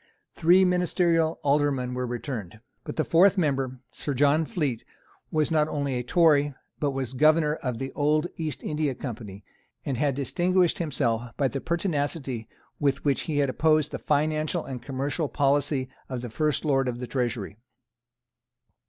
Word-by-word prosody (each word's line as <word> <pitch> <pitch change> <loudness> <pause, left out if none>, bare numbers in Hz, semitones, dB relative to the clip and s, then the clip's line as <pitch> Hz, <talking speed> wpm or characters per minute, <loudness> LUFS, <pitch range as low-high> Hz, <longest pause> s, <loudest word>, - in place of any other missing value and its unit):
Three 180 +3 +5
ministerial 175 -2 +2
Aldermen 140 -3 +1
were 125 0 -2
returned. 120 - -5 0.3
But - - -5
the 155 - +1
fourth 190 +5 +4
member, 135 -6 0
Sir 145 - -4
John 145 +4 +3
Fleet, 140 -10 -2 0.5
was 155 0 0
not 155 -1 +3
only 140 -3 -2
a 125 - -1
Tory, 145 0 +3 0.2
but 145 - +1
was 135 -2 -3
Governor 155 +2 +4
of 125 -3 -3
the 135 +1 -4
old 150 +2 +1
East 155 -3 -4
India 150 -3 -1
Company, 105 -7 -7 0.4
and 135 -3 -2
had 140 0 +1
distinguished 175 +6 +1
himself 120 -7 -1
by 140 - +2
the 135 +3 -4
pertinacity 145 - -2 0.3
with 140 -1 0
which 140 -2 +2
he 150 - 0
had 140 -2 +2
opposed 155 0 +2
the - - -4
financial 155 +2 0
and 130 -3 -6
commercial 140 +4 -2
policy 140 -1 +1 0.2
of 125 -2 -4
the 120 - -6
first 150 +4 0
Lord 135 -3 +2
of 120 -1 -2
the 125 - -5
Treasury. 120 -6 -3
145 Hz, 160 wpm, -26 LUFS, 130-155 Hz, 0.5 s, Three